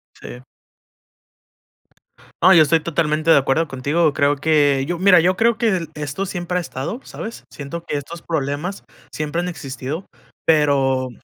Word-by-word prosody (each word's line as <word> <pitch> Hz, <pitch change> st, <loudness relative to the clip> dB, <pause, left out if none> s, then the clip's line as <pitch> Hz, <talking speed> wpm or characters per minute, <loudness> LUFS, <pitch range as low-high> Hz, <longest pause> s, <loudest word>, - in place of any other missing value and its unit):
Sí. 125 Hz, -, -10 dB, 2.0 s
No, 190 Hz, -, +7 dB
yo 165 Hz, -3 st, +7 dB
estoy 160 Hz, +2 st, +3 dB
totalmente 155 Hz, 0 st, -1 dB
de -, -, +8 dB
acuerdo 140 Hz, +4 st, +1 dB
contigo. 145 Hz, +4 st, 0 dB
Creo 140 Hz, -1 st, +2 dB
que 145 Hz, -3 st, +2 dB
yo 175 Hz, 0 st, -2 dB
mira, 185 Hz, -1 st, +6 dB
yo 180 Hz, +3 st, +2 dB
creo, 230 Hz, +1 st, +2 dB
que 190 Hz, -8 st, 0 dB
esto 150 Hz, +6 st, -4 dB
siempre 180 Hz, -1 st, -3 dB
ha -, -, 0 dB
estado, 170 Hz, -, -5 dB
¿sabes? 225 Hz, +1 st, -8 dB
Siento 155 Hz, +4 st, -7 dB
que 145 Hz, -, -3 dB
estos 165 Hz, +4 st, -8 dB
problemas 155 Hz, +4 st, -3 dB, 0.3 s
siempre 155 Hz, +3 st, -3 dB
han 180 Hz, -, -3 dB
existido, 140 Hz, +2 st, -6 dB, 0.4 s
pero 135 Hz, -4 st, +2 dB
155 Hz, 150 wpm, -20 LUFS, 140-175 Hz, 2.0 s, de